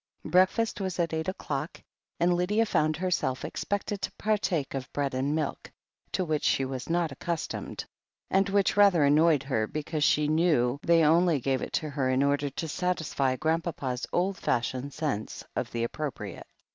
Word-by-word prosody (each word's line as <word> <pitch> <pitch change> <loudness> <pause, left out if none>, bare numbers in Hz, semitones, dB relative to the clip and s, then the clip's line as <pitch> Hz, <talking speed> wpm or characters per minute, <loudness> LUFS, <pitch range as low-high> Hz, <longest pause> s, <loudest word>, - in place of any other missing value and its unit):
Breakfast 195 +5 +2
was 190 -2 -3
at 170 -2 0
eight 160 0 -2
o'clock, 155 -5 -4 0.4
and 175 +1 +3
Lydia 200 +6 +2
found 155 -7 +1
herself 170 -8 -1
expected 205 0 -3
to - - -2
partake 200 -9 -1
of 135 -2 -5
bread 140 -2 -1
and 140 +4 0
miUc, 150 -3 -3 0.5
to 185 - 0
which 155 -2 -1
she 135 - +2
was 130 +1 -5
not 170 -2 +1
accustomed, 165 +4 -4 0.5
and 195 +1 +3
which 200 0 +2
rather 200 -6 +5
an 140 0 +5
noyed 155 -2 +4
her 115 -6 0
because 155 +2 -3
she 150 0 +3
knew 150 -5 +2
they 165 -1 +4
only 165 0 +4
gave 130 0 0
it - - -5
to 155 -2 -1
her 135 -2 0
in 130 +1 +2
order 140 0 +1
to 160 +4 -5
satisfy 160 -6 0
Grandpapa's 160 -4 -2
old 185 +2 0
fashioned 130 0 -1
sense 135 -9 -3
of - - -2
the 115 0 -2
appropriate. 140 +3 -5
155 Hz, 170 wpm, -28 LUFS, 135-180 Hz, 0.5 s, rather